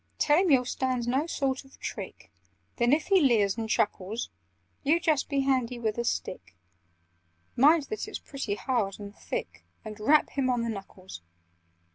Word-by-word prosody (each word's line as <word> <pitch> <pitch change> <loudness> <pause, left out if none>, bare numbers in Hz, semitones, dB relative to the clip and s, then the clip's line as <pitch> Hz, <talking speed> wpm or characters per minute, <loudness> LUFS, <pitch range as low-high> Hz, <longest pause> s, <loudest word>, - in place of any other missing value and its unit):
"Tell 295 +2 +4
him 375 -1 +2
you'll 260 -4 +4
stand 255 -1 -1
no 270 +6 +1
sort 270 -4 -1
of 270 - -19
trick; - - -7 0.5
Then, 240 0 +3
if 305 +2 +3
he 385 -2 +5
leers 215 -8 +3
and 225 -1 -4
chuckles, 210 +2 -1 0.5
You 305 +4 +3
just 310 -4 +1
be 280 -2 +1
handy 255 -3 0
with 225 -1 -2
a - - 0
stick 185 - -4 1.0
(Mind 300 +5 +5
that 430 +9 -5
it's - - -5
pretty 270 -8 -4
hard 210 -5 -1
and 205 0 -9
thick) - - -6 0.2
And 215 0 -8
rap 295 +8 +4
him 270 -2 0
on 245 -2 +1
the 235 - -2
knuckles! 195 - -8
255 Hz, 170 wpm, -28 LUFS, 220-285 Hz, 1.0 s, he